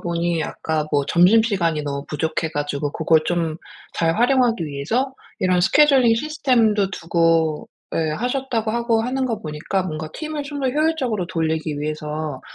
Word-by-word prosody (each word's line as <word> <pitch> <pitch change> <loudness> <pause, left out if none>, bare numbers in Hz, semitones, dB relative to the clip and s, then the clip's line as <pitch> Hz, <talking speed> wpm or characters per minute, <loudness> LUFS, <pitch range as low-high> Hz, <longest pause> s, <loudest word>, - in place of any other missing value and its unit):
보니 170 -1 -1
아까 155 0 -2
뭐 145 -1 +2
점심시간이 180 -3 +3
너무 140 -1 -4
부족해 160 +1 -2
가지고 145 -1 -3
그걸 160 -1 +3
좀 165 -2 -1 0.4
잘 165 -1 +1
활용하기 245 -5 +3
위해서 220 - -2 0.2
이런 185 -1 +2
스케줄링 270 -1 +5
시스템도 230 -8 +1
두고 165 -3 +1 0.3
예 160 -1 0
하셨다고 240 - -2
하고 235 -1 +1
하는 260 +3 -1
거 230 -4 -3
보니까 155 +5 -2
뭔가 155 -3 -5
팀을 310 -2 -4
좀 285 0 -6
더 265 - +1
효율적으로 265 - 0
돌리기 160 -3 -2
위해서 150 -1 -4
175 Hz, 340 characters per minute, -21 LUFS, 155-240 Hz, 0.4 s, 스케줄링